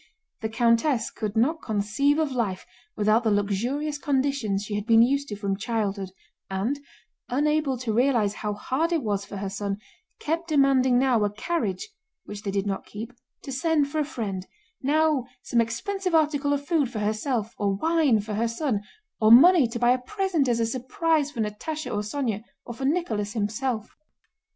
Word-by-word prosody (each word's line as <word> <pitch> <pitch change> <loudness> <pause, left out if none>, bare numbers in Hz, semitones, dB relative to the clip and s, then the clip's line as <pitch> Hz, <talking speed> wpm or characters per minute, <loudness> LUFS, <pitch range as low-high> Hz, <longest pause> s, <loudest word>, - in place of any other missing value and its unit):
The 220 - -2
countess 230 +2 +2
could 215 -1 -4
not 305 +9 +2
conceive 220 +8 +1
of 310 -3 0
life 215 -7 -2 0.3
without 215 +2 +3
the 225 - +2
luxurious 240 +9 -1
conditions 265 -8 0
she 210 - -6
had 205 +1 -3
been 225 -1 +7
used 280 +3 +1
to 210 - -5
from 200 -1 -2
childhood 205 -3 -2 0.4
and, 205 +9 -1 0.5
unable 295 0 +1
to 235 -3 -2
realize 235 -4 +2
how 210 0 -3
hard 285 +10 -1
it 330 -4 +1
was 200 -2 -1
for 200 - -8
her 195 +1 -3
son, 200 0 -3 0.4
kept 330 +3 -2
demanding 270 -4 +4
now 250 -4 +3
a 205 - +2
carriage 210 - -2 0.4
(which 205 0 -7
they 205 - -4
did 195 0 -1
not 195 -1 -3
keep) 225 +4 -7 0.3
to 275 - -6
send 290 +1 +1
for 310 - -1
a - - +3
friend, 205 -10 -4 0.3
now 300 -2 +2 0.2
some 235 - +2
expensive 360 - -2
article 295 -2 +2
of 285 0 -1
food 310 -7 +2
for 225 - -6
herself, 215 +2 -1
or 200 -1 +1
wine 310 -1 +3
for 210 +1 -6
her 225 +3 +1
son, 230 -2 -1 0.4
or 215 0 +5
money 300 +3 +8
to 235 +1 -5
buy 240 +1 +4
a 255 - +2
present 380 -1 0
as 235 -1 +1
a 230 - +2
surprise 280 +6 0
for 240 -6 -4
Natásha 260 +9 -4
or 205 - 0
Sónya, 215 -1 -2 0.2
or 240 - -6
for 265 +3 -5
Nicholas 225 - -1
himself. 220 +1 -2
240 Hz, 180 wpm, -26 LUFS, 210-285 Hz, 0.5 s, money